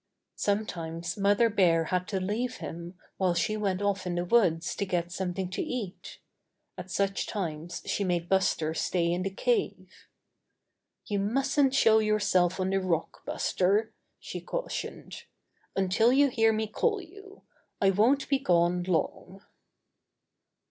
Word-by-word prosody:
Sometimes 170 -5 -2
Mother 205 +3 +3
Bear 180 -6 +3
had 180 +2 -1
to 190 +3 -2
leave 225 +7 -2
him 170 +2 -7 0.2
while 185 -2 +1
she 215 +5 0
went 200 -2 -1
off 200 -2 -1
in 175 - -2
the 175 0 -1
woods 175 -6 +2
to - - 0
get 175 -1 -1
some 185 0 -2
thing 185 +1 -3
to - - -2
eat. 235 - -5 0.6
At 185 - -8
such 195 +1 -1
times 175 -3 -4
she 205 - -1
made 175 -2 -1
Buster 180 -4 +1
stay 170 +1 0
in 175 +1 -1
the 195 - -1
cave. 420 - -1 1.1
"You 205 -3 -1
mustn't 270 +6 +1
show 220 -4 +5
yourself 200 -4 +2
on 185 0 0
the 195 - +2
rock, 170 -3 -2
Buster," 205 +4 +1 0.3
she - - -7
cautioned, - - -5 0.5
"until 195 +5 +3
you 280 +2 +4
hear 225 -2 +3
me 220 0 -1
call 420 - 0
you. 395 +3 -14 0.4
I 195 -1 +4
won't 245 +8 +3
be 275 -1 +2
gone 175 -5 +2
long." 185 +2 -2
195 Hz, 150 wpm, -28 LUFS, 175-220 Hz, 1.1 s, show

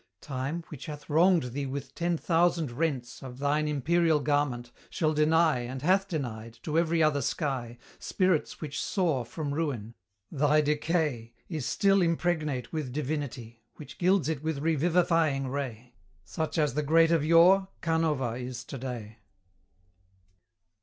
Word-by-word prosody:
Time, 140 +5 -4
which 150 0 -9
hath 150 -1 -8
wronged 165 -4 +3
thee 140 0 -3
with 140 +1 -6
ten 170 0 -1
thousand 165 -3 +1
rents 130 -3 -3
Of 125 -2 -9
thine 145 +2 0
imperial 155 +2 +2
garment, 140 -5 -1 0.2
shall 155 -2 0
deny, 155 -1 +3
And 130 +2 -6
hath 190 +4 +3
denied, 115 - -5
to 160 +1 +1
every 165 -1 +2
other 150 -2 +2
sky, 130 -4 -2 0.2
Spirits 185 -4 0
which 150 -3 -4
soar 165 - 0
from 145 +4 -5
ruin: 135 -8 -3 0.4
thy 150 +1 +3
decay 150 -6 -1
Is 155 -8 -3
still 195 +7 +3
impregnate 165 -6 -1
with 150 -5 -3
divinity, 130 -5 -4
Which 150 -3 -12
gilds 185 -3 +3
it 155 -4 -2
with 160 -1 -2
revivifying 160 -2 +1
ray; 125 -3 -5 0.3
Such 160 0 -4
as 150 -5 +2
the 150 - 0
great 165 +3 +4
of 165 -3 +3
yore, 175 +5 +5 0.2
Canova 160 -7 +1
is 125 -1 -6
to 135 +1 -8
day. 115 -4 -7
150 Hz, 145 wpm, -28 LUFS, 130-165 Hz, 0.4 s, yore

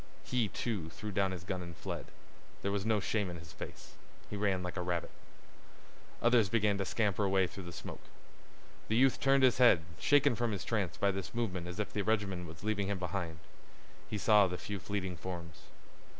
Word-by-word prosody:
He, 125 -3 +1
too, 100 -6 -3
threw 105 +5 -6
down 100 -1 +2
his 90 -2 -5
gun 95 -1 -3
and 85 -2 -8
fled. - - -5 0.6
There 100 - +1
was 100 +1 -1
no 110 -2 +3
shame 100 0 0
in 85 - -5
his 80 0 -11
face. - - -9 0.4
He - - -3
ran 100 -3 +1
like 90 - -4
a 95 - -1
rabbit. 85 -2 -2 1.1
Others 120 -4 +5
began 105 -2 +2
to 100 - 0
scamper 105 0 +1
away 95 -1 +3
through 95 +1 -8
the 85 - -6
smoke. 85 - -8 0.9
The 110 - +1
youth 130 +2 +4
turned 135 0 +4
his 130 -1 +5
head, 120 -10 +7 0.2
shaken 145 - +5
from 115 0 0
his 100 - -4
trance 100 -7 -1
by 100 - +3
this 95 -1 -5
movement 95 -7 -1
as 90 +3 -6
if 105 - -2
the 105 - 0
regiment 100 -4 0
was 80 +2 -11
leaving 105 -2 0
him 100 0 -1
behind. 90 -2 -3 0.7
He 105 - -2
saw 105 -1 +6
the 90 0 -3
few 100 +1 -5
fleeting 95 -2 -3
forms. 85 -2 -7
100 Hz, 200 wpm, -33 LUFS, 90-105 Hz, 1.1 s, head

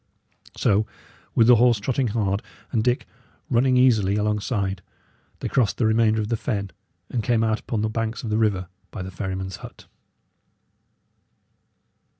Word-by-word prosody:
So, 105 +2 +2 0.5
with 115 - +5
the 120 0 +7
horse 120 -1 +4
trotting 130 +4 0
hard, 105 -2 0 0.3
and 110 -4 +1
Dick 125 +1 +1 0.5
running 125 +2 +3
easily 110 -6 +4
alongside, 105 -2 -1 0.6
they - - -2
crossed 125 -6 +1
the 120 - +1
remainder 110 0 +3
of 105 0 -2
the 115 - 0
fen, 100 -6 -3 0.4
and 120 - 0
came 115 -1 +2
out 110 -1 +1
upon 110 -3 -3
the - - +1
banks 115 +2 -3
of 110 - -4
the 105 - +1
river 100 -5 +1 0.2
by 95 - -6
the 95 - -7
ferryman's 95 0 -4
hut. - - -12
110 Hz, 155 wpm, -24 LUFS, 100-120 Hz, 0.6 s, the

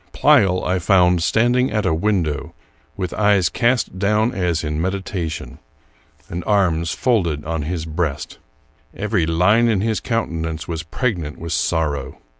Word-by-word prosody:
Pleyel 90 -2 +4
I 90 0 +1
found 90 -1 +3
standing 120 +7 +2
at 105 -1 -1
a 90 - +2
window, 80 -5 -1 0.4
with 90 -3 -3
eyes 100 -4 +3
cast 120 -6 0
down 105 +4 +1
as 85 -4 -1
in 75 0 -2
medi 95 +3 -1
tation, 85 -4 -5 0.7
and 85 +1 -5
arms 85 -5 +1
folded 85 - 0
on 80 0 -2
his 80 +2 -3
breast. 80 -3 -3 0.6
Every 100 -5 0
line 95 +8 +3
in 105 -5 +1
his 110 +1 0
countenance 80 -9 -3
was 80 -2 -3
pregnant 85 - -3
with 85 0 -5
sorrow. 75 -5 -1
90 Hz, 145 wpm, -20 LUFS, 80-105 Hz, 0.7 s, Pleyel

